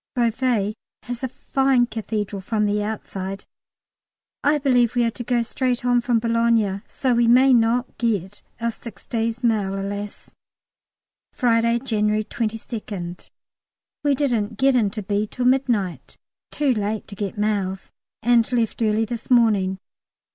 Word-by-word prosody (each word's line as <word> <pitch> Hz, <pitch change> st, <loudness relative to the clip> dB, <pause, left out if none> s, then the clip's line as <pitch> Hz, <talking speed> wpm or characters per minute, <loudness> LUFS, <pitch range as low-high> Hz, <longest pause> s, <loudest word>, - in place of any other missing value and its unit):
Beauvais 235 Hz, -3 st, +1 dB, 0.3 s
has 245 Hz, -1 st, -5 dB
a 260 Hz, -, -1 dB
fine 265 Hz, 0 st, +1 dB
Cathedral 215 Hz, -3 st, -4 dB
from 210 Hz, +2 st, 0 dB
the 205 Hz, 0 st, +1 dB
outside. 195 Hz, -2 st, -5 dB, 1.0 s
I 295 Hz, +1 st, +4 dB
believe 250 Hz, -4 st, +2 dB
we 240 Hz, -, +3 dB
are 230 Hz, -, +1 dB
to 240 Hz, -, -7 dB
go 240 Hz, 0 st, +1 dB
straight 250 Hz, +1 st, -1 dB
on 245 Hz, -1 st, +3 dB
from 240 Hz, -1 st, +1 dB
Boulogne, 230 Hz, -3 st, +1 dB
so 260 Hz, -2 st, 0 dB
we 235 Hz, 0 st, +3 dB
may 255 Hz, +3 st, +6 dB
not 235 Hz, +1 st, +1 dB
get 205 Hz, -4 st, -1 dB, 0.2 s
our 235 Hz, 0 st, 0 dB
six 220 Hz, -3 st, -11 dB
days' 230 Hz, 0 st, -2 dB
mail, 205 Hz, -4 st, +1 dB
alas! 200 Hz, +1 st, -6 dB, 1.0 s
Friday, 235 Hz, -1 st, +2 dB
January 215 Hz, -3 st, 0 dB
22nd. 215 Hz, -5 st, -5 dB, 0.7 s
We 285 Hz, -1 st, +3 dB
didn't 230 Hz, -6 st, 0 dB
get 270 Hz, +2 st, +3 dB
in 220 Hz, -5 st, +3 dB
to 210 Hz, +1 st, -6 dB
B. 205 Hz, +2 st, -1 dB
till 250 Hz, +3 st, -3 dB
midnight, 215 Hz, -, 0 dB, 0.3 s
too 285 Hz, -3 st, +1 dB
late 210 Hz, -1 st, -2 dB
to -, -, -10 dB
get 200 Hz, 0 st, -4 dB
mails, 200 Hz, -2 st, -1 dB, 0.3 s
and 235 Hz, 0 st, +3 dB
left 235 Hz, -2 st, 0 dB
early 220 Hz, 0 st, +2 dB
this 235 Hz, 0 st, -6 dB
morning. 210 Hz, -6 st, +3 dB
230 Hz, 145 wpm, -23 LUFS, 205-245 Hz, 1.0 s, may